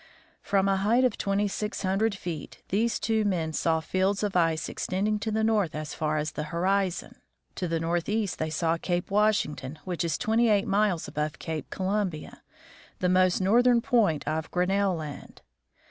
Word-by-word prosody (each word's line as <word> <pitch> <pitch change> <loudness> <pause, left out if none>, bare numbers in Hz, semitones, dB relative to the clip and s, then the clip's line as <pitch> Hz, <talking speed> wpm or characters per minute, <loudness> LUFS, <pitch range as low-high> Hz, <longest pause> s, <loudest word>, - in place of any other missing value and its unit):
From 195 -1 +1
a 195 -1 +2
height 220 +6 +3
of 255 - +2
twenty 200 +1 0
six 210 +2 -4
hundred 200 +3 +1
feet 170 -6 -7
these 225 +4 +1
two 220 -1 +1
men 170 -6 -1
saw 160 +1 +1
fields 190 +4 0
of 205 -2 -1
ice 165 -2 +2
extending 210 +3 -1
to 215 +2 -3
the 220 0 0
north 210 -8 +1
as 155 0 -5
far 155 0 -1
as 150 0 -2
the 150 - -4
hori 185 +5 +1
zon. 175 - -8 0.4
To 180 - -3
the 165 0 -1
northeast 175 +5 -1
they 155 - -1
saw 165 +1 0
Cape 175 +2 -2
Washington, 195 -9 +1
which 180 -2 -2
is 165 -3 -1
twenty 230 0 +2
eight 205 -2 +3
miles 200 -4 +1
above 150 0 -3
Cape 160 -3 -5
Columbia, 190 -4 -3 0.6
the 180 - 0
most 185 0 +3
northern 240 +5 +4
point 230 - +1
of 155 +1 -2
Grinnell 190 +1 +1
land. 155 -3 -8
185 Hz, 175 wpm, -27 LUFS, 165-210 Hz, 0.6 s, northern